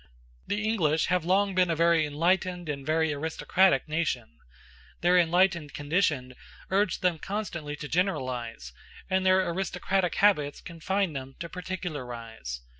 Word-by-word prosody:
The 210 +1 -1
English 160 -8 +2
have 180 -3 +1
long 195 +2 +2
been 180 -1 +3
a 165 - +1
very 165 -1 +3
enlightened 175 +3 0
and 140 -2 -3
a - - -13
very 160 -1 +2
aristocratic 160 +2 +2
nation; 155 -7 -2 0.6
their 175 +1 +4
enlightened 175 -3 +2
condition 145 -4 0 0.4
urged 195 -1 +1
them 175 -3 +2
constantly 170 -8 -4
to 150 0 -7
generalize, 125 - -2 0.4
and 190 0 +2
their 185 0 +4
aristocratic 180 +1 -1
habits 150 -9 +3
confined 175 +1 -2
them 135 0 -6
to 170 - -4
particularize. 125 - -6
170 Hz, 135 wpm, -28 LUFS, 145-185 Hz, 0.6 s, their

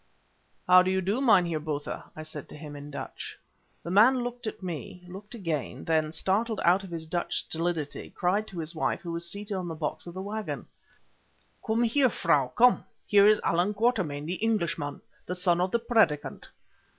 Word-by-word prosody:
"How 180 0 +8
do 185 - 0
you 190 0 +2
do, 200 +7 0
Meinheer 180 - +4
Botha?" 150 -1 -4
I 155 - -6
said 155 -2 -9
to - - -10
him 150 -1 -8
in 145 0 -8
Dutch. 140 - -7 0.5
The 170 - -5
man 240 +6 +5
looked 245 -1 -5
at 215 - -6
me, 180 +1 -6
looked 205 +5 -9
again, 155 - -3
then, 155 -1 +1
startled 205 +7 0
out 180 +3 +4
of 190 - -9
his 165 -2 -5
Dutch 170 +2 -2
stolidity, 165 -3 -2
cried 200 +4 0
to 185 - -10
his 165 0 -3
wife, 160 - -1
who 170 - -5
was 170 0 -4
seated 200 +3 -4
on 185 -2 -3
the 165 - -4
box 155 +2 -4
of 175 - -8
the - - -4
waggon— 215 +1 -4 1.0
"Come 225 +1 +1
here, 255 +3 +4
Frau, 150 - +2
come. 245 - +4 0.2
Here 200 0 +6
is 215 0 +5
Allan 180 +5 +1
Quatermain, 190 - 0
the 180 +4 -4
Englishman, 170 -9 -1 0.3
the 180 - -2
son 175 -1 +2
of 185 - +1
the 235 - +2
'Predicant. 225 -11 +1
180 Hz, 190 wpm, -28 LUFS, 160-210 Hz, 1.0 s, How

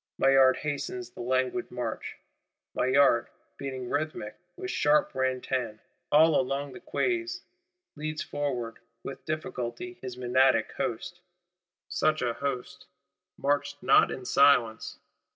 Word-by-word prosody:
Maillard 135 -1 +5
hastens 140 -5 -4
the - - -9
languid 130 +8 0
march. 120 -2 -4 0.6
Maillard, 130 -2 +4 0.3
beating 130 -2 -5
rhythmic, 145 -7 -3 0.2
with 375 - -4
sharp 150 +1 +3
ran 130 -1 0
tan, 125 -5 -2 0.3
all 155 +1 +6
along 135 +1 -3
the - - -9
Quais, 350 -2 -1 0.7
leads 155 +1 -4
forward, 125 -6 -3 0.2
with 135 - -7
difficulty 155 +2 -4
his 125 -1 -6
Menadic 130 +1 +3
host. 175 +10 -4 0.7
Such 155 -3 +1
a 120 -1 0
host—marched 140 +2 -4
not - - +6
in 130 - -6
silence! 125 -5 +3
135 Hz, 115 wpm, -28 LUFS, 125-145 Hz, 0.7 s, all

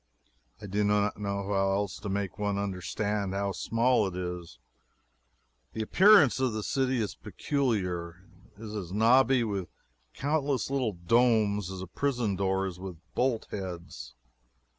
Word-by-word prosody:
I - - -9
do 105 +1 0
not 105 0 +1
know 100 -1 -2
how 95 -1 +1
else 100 -1 -2
to 105 - -5
make 100 -1 -3
one 100 -1 0
understand 100 +1 -2
how 100 0 -1
small 115 +3 +1
it 90 - -6
is. 90 -2 -5 1.2
The 110 - -2
appearance 180 - +6
of 130 -3 +1
the 110 -1 -3
city 130 0 0
is 105 -3 -2
peculiar. 90 - -2 0.3
It 110 - -11
is 110 -1 -6
as 90 -5 -5
knobby 120 +4 +4
with 100 -6 -3 0.5
countless 140 -2 -1
little 130 -6 0
domes 105 +1 +2
as 95 -1 -6
a - - -5
prison 120 -1 -1
door 95 0 0
is 90 -2 -6
with 95 -2 -7 0.2
bolt 125 -3 0
heads. 85 -10 -7
100 Hz, 150 wpm, -29 LUFS, 95-120 Hz, 1.2 s, appearance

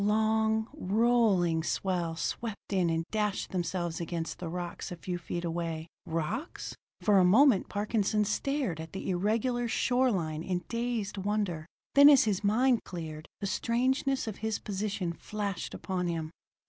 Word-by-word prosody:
Long, 220 +1 +2
rolling 210 - +3
swell 175 -1 -1
swept 210 +5 -4
in 180 -3 +2
and 165 0 0
dashed 210 -2 -1
themselves 175 -2 -2
against 170 0 -4
the 175 - -4
rocks 175 +1 -5
a - - -4
few 175 +1 -4
feet 175 0 -4
away. 165 -1 -3 0.2
Rocks? 165 - -3 0.3
For 205 -2 +5
a - - +6
moment 220 +4 +5
Parkinson 210 0 +1
stared 250 - -1
at 160 0 -8
the 190 0 -3
irregular 230 +6 0
shore 250 +3 +2
line 160 -7 -1
in 180 +1 -2
dazed 230 -4 -2
wonder. 190 -5 -1 0.3
Then 285 +1 +9
as 280 -4 +7
his 210 -2 0
mind 240 +4 +3
cleared, 160 -3 -7
the - - -1
strangeness 255 +6 +1
of 220 -3 -5
his 220 -1 -1
position 195 -3 -3
flashed 200 0 -4
upon 180 -2 -2
him. 160 -2 -3
200 Hz, 150 wpm, -30 LUFS, 175-220 Hz, 0.3 s, Then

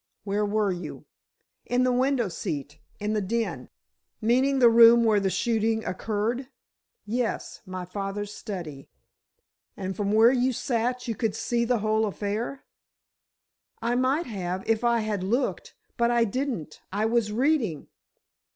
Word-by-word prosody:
"Where 205 +1 0
were 210 -1 +1
you?" 180 0 -6 0.6
"In 245 +1 +1
the 255 - +3
window 255 -2 +2
seat—in 155 +5 -5
the 215 - +1
den." 230 +4 -2 0.5
"Meaning 255 +5 +2
the 250 -2 +7
room 235 0 +8
where 220 -2 +4
the 195 -1 0
shooting 225 +1 0
occurred?" 220 +7 -2 0.6
"Yes. 235 +2 -2
My 185 -1 -5
father's 200 +2 -4
study." 170 -10 -7 0.9
"And 190 -1 -4
from 200 +1 -1
where 220 +3 +6
you 255 0 +2
sat, 245 +1 -1
you 230 - 0
could 220 -1 -1
see 235 +1 0
the 245 0 +2
whole 215 0 +2
affair?" 210 +6 -3 1.2
"I 235 +1 0
might 260 +6 +1
have—if 195 +1 -2
I 235 -1 +3
had 210 -3 -2
looked—but 235 +2 -2
I 240 -1 +3
didn't. 230 - -3
I 205 +3 0
was 225 -1 +1
reading." 235 - 0
220 Hz, 135 wpm, -26 LUFS, 200-240 Hz, 1.2 s, room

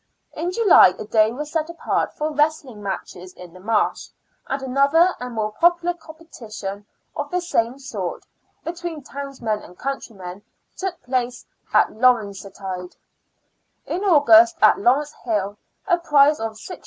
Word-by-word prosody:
In 350 +2 -3
July 390 - +6
a - - -6
day 215 0 +3
was 295 +5 -6
set 320 -1 -1
apart 335 - -1
for 305 +1 -1
wrestling 295 -6 -1
matches 185 -2 -6
in 180 -2 -13
the 185 - -13
Marsh, 215 +2 0 0.4
and 270 - -2
another 280 +7 +3
and 250 -1 -6
more 215 -1 -1
popular 345 +5 +2
competition 230 - -9 0.3
of 290 0 -4
the 360 - 0
same 255 -8 -1
sort, 215 -10 -5 0.4
between 335 -3 -6
tov^oismen 265 -7 -4
and 180 - -14
countrymen 205 -9 -6 0.3
took 380 -2 -4
place 250 -1 -2 0.3
at - - +4
Lawrencetide, 200 -6 -1 0.9
in 365 +4 -3
August, 335 -1 +6
at - - +5
Lawrence 270 +8 +2
Hill, 205 -4 -1 0.3
a 350 -3 +3
prize 295 -2 +4
of 225 0 -3
6s. 360 - -9
265 Hz, 140 wpm, -22 LUFS, 210-325 Hz, 0.9 s, July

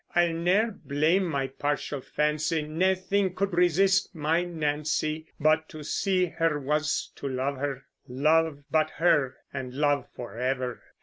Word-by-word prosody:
I'll 175 -1 +3
ne'er 185 +7 +2
blame 160 +2 +1
my 140 -6 -1
partial 145 +1 -3
fancy, 150 +3 0
Naething 185 +4 0
could 200 -1 -1
resist 190 +2 +3
my 160 +3 +1
Nancy; 155 -1 -1
But 155 +1 +2
to 155 -1 -9
see 185 +4 +1
her 165 -2 0
was 150 +2 -1
to 140 - -4
love 135 +1 -2
her; 135 -1 -3 0.2
Love 150 +3 +2
but 155 -1 +3
her, 150 -6 +3 0.2
and 130 -2 -5
love 145 0 +1
forever. 125 +1 -3
155 Hz, 135 wpm, -27 LUFS, 145-175 Hz, 0.2 s, I'll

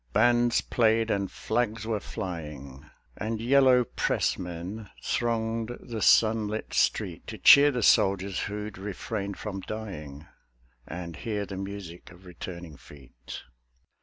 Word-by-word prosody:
Bands 120 +2 +4
played 115 -1 +2
and 100 -1 0
flags 110 -1 -2
were 110 -2 -1
flying, 75 -8 -7 0.3
And 110 +1 -3
Yellow 130 +1 +5
Pressmen 95 -1 -2
thronged 115 0 -1
the 115 -3 -6
sunlit 110 -1 +3
street - - 0
To - - -6
cheer 145 +1 +8
the 125 -5 -1
soldiers 95 -1 +3
who'd 105 -1 -5
refrained 100 0 -4
from 100 -2 -5
dying, 80 -10 -7 0.6
And 85 -1 -6
hear 105 0 -3
the 95 -1 -7
music 95 -3 -7
of 90 +2 -17
returning 85 -3 -8
feet. 65 -4 -12
105 Hz, 120 wpm, -27 LUFS, 90-115 Hz, 0.6 s, cheer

